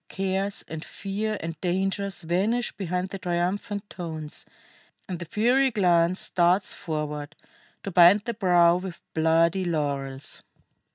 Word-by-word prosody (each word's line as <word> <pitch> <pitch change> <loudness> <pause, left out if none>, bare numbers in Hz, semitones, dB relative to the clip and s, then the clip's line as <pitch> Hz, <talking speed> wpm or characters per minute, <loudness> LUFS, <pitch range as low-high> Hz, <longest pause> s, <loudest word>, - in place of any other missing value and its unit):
Cares 195 +1 -2
and 160 0 -6
fear 210 +2 -3
and 165 -1 -6
dangers 195 +1 -1
vanish 200 +9 0
behind 180 -1 -2
the 195 - -6
triumphant 185 +4 -2
tones, 160 -6 -4 0.6
and 180 -3 -4
the 170 - -6
fiery 245 +9 +3
glance 180 -5 +2
darts 180 +2 +2
forward, 150 -2 -4 0.5
to 195 - -4
bind 180 +3 +7
the 235 +3 -3
brow 175 -5 +4
with 180 -2 -7
bloody 165 +3 +3
laurels. 140 -5 -2
180 Hz, 125 wpm, -26 LUFS, 165-195 Hz, 0.6 s, bind